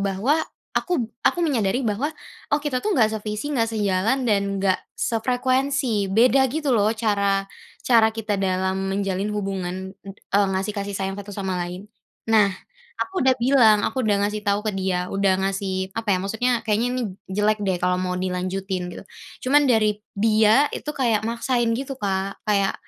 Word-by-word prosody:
bahwa 200 +11 +1 0.3
aku 350 -9 0 0.2
aku - - +2
menyadari 245 -2 0
bahwa, 220 +7 0 0.4
"Oh, 290 - +3
kita 255 -4 -1
tuh 430 - 0
nggak 225 - +5
sevisi, 215 +3 -4
nggak 230 -3 +1
sejalan, 215 +4 0
dan 200 -2 +1
nggak 190 -1 +2 0.2
sefrekuensi." 255 -1 0
Beda 250 +6 +4
gitu 295 -1 -1
loh 210 -2 +3
cara 200 -3 +1 0.4
cara 230 -3 +5
kita 220 -1 -3
dalam 190 0 0
menjalin 195 0 -1
hubungan 190 -2 -4
ed 195 0 -10 0.2
eee, 200 0 +5
ngasih 195 +2 -1
kasih 200 -1 -4
sayang 195 0 -2
satu 205 0 -10
sama 190 -2 -2
lain. 180 +2 -6 0.4
Nah, 220 -2 +5 0.5
aku 380 -1 -2
udah 260 0 +4
bilang, 235 -4 +5
aku 260 - -2
udah 210 -2 +2
ngasih 210 +1 -3
tahu 205 +1 +1
ke 215 - 0
dia 185 -2 -1
udah 195 -1 +2
ngasih 190 -1 -2
apa 225 -2 -2
ya, - - -2
maksudnya, 220 +5 0
"Kayaknya 220 +2 +1
ini 255 - -1 0.3
jelek 210 +2 +1
deh 190 -2 0
kalau 180 0 +2
mau 180 0 -2
dilanjutin," 185 0 -3
gitu. - - -9 0.4
Cuman 285 +1 +4
dari 215 -2 +2 0.2
dia 220 +5 +4
itu - - -7
kayak 230 -6 +1
maksain 240 0 0
gitu, 270 +2 -4
Kak, 195 -1 -2
kayak, 200 -2 +2
210 Hz, 170 wpm, -23 LUFS, 195-235 Hz, 0.5 s, nggak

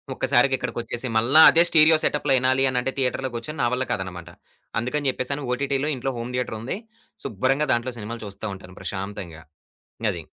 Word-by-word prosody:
ఒక్కసారిగా 130 +2 +3
ఇక్కడికొచ్చేసి, 120 0 -4
మల్ల 120 +6 +1
అదే 165 - +6
స్టీరియో 160 -1 +6
సెటప్‌లో 145 -2 +1
ఇనాలి 130 +1 +2
అనంటే 125 +1 -1
థియేటర్‌లో 130 0 -1
కూర్చుని 135 +7 -6
నా - - +3
వల్ల 130 +1 0
కాదనమాట. 90 -3 -5 0.5
అందుకని 135 +4 -1
జెప్పేసను 140 +3 -3
ఓటిటి‌లో 140 +2 -1
ఇంట్లో 135 +1 -3
హోమ్ 120 +2 -6
థియేటరుంది, 125 - -3 0.5
శుభ్రంగా 135 +8 0
దాంట్లో 120 +2 -2
సినిమాలు 110 +2 -6
చూస్తా 100 +1 -7
ఉంటాను 95 -1 -13
ప్రశాంతంగా. 95 -5 -6 0.7
అది. - - -6
125 Hz, 150 wpm, -23 LUFS, 110-135 Hz, 0.7 s, అదే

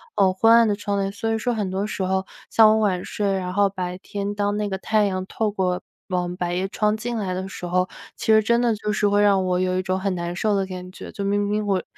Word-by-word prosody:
呃， 190 -1 +4
昏 225 +4 +4
暗 230 -1 +6
的 205 - +1
窗 200 0 -2
帘， 195 0 -1
所 225 +2 -3
以 - - +1
说 245 +2 -1
很 205 -4 -2
多 195 +2 -2
时 200 -2 -3
候 190 +1 0 0.2
像 220 -1 +6
我 220 - +3
晚 190 -4 +1
睡， 200 -2 -1
然 180 -1 -2
后 200 0 +4
白 180 -1 -4
天 200 +1 -4
当 205 0 0
那 210 -1 -1
个 190 - -2
太 215 +2 +1
阳 185 -1 -2
透 215 +2 -1
过 185 -2 -1 0.3
往 180 -1 -2
百 175 -1 -2
叶 185 +2 -1
窗 210 +1 +1
进 235 +1 -4
来 190 -4 -2
的 190 +1 -3
时 180 - -7
候， 180 +1 0 0.3
其 - - -7
实 220 - +6
真 235 +2 +2
的 235 -2 +2
就 210 0 -2
是 205 0 +2
会 205 0 +3
让 200 -2 +4
我 180 0 +1
有 185 0 0
一 185 - +1
种 185 0 -1
很 195 -1 -1
难 170 0 -3
受 210 +2 +1
的 195 - +1
感 180 -1 -7
觉， - - -9
就 200 - -4
明 200 +1 +1
明 210 +1 -1
我 190 -3 +1
195 Hz, 295 characters per minute, -23 LUFS, 185-210 Hz, 0.3 s, 暗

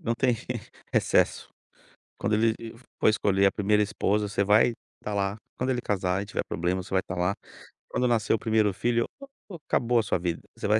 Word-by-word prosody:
não 115 - -1
tem 120 -1 +2 0.6
recesso. - - +2 0.7
Quando 110 - -1
ele 115 +1 +3
e 115 0 -8 0.3
for - - +5
escolher 100 -2 +2
a - - +2
1º 105 +1 +2
esposa 105 0 0
você 100 0 0
vai 105 +4 +4 0.3
estar 105 - -5
lá, 100 +1 -1 0.2
quando 130 +1 -1
ele 125 -2 0
casar 95 -2 0
e - - -9
tiver 100 - -3
problema 90 +2 -1
você - - -14
vai 95 -1 +3
estar 95 - -6
lá, 90 +3 0 0.5
quando 125 - +1
nascer 110 -3 +2
o 115 - +1
1º 110 -3 +2
filho 115 +4 +1
o 275 - -10 0.2
o - - -6
acabou 120 0 +2
a 115 - +4
sua 95 - 0
vida, 85 -1 -2 0.2
você - - -3
vai 105 +1 +4
105 Hz, 210 wpm, -27 LUFS, 100-115 Hz, 0.7 s, for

